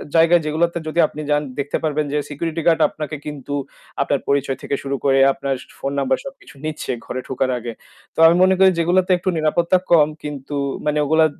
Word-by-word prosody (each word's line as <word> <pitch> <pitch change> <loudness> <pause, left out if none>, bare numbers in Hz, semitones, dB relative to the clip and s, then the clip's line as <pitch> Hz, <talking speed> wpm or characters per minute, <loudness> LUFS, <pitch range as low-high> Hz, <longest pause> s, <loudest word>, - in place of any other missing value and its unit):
জায়গায় 165 +1 +5
যেগুলাতে 170 +3 0
যদি 160 +2 -2
আপনি 155 - -8
যান 145 - +3 0.2
দেখতে 140 0 -1
পারবেন 155 -1 0
যে - - +1
security 165 +3 -3
guard 165 -2 +4
আপনাকে 155 0 -6
কিন্তু 145 -1 -6 0.5
আপনার - - +1
পরিচয় 140 -2 0
থেকে 140 - -2
শুরু 140 0 -2
করে 135 -1 +4
আপনার 135 0 -2 0.3
phone 140 +1 -3
number 130 -1 +1
সবকিছু 275 - -11
নিচ্ছে 155 -1 -4
ঘরে 130 - -4
ঢোকার 130 0 -1
আগে। 120 0 -5 0.4
তো - - -6
আমি 165 - +5
মনে 190 0 +4
করি 190 - +7
যেগুলাতে 180 +2 +2
একটু 185 - -2
নিরাপত্তা 170 +4 +2
কম 155 -4 +6 0.2
কিন্তু 145 -1 -6 0.3
মানে 150 0 +1
ওগুলা 160 +2 +4
150 Hz, 190 wpm, -20 LUFS, 140-170 Hz, 0.5 s, করি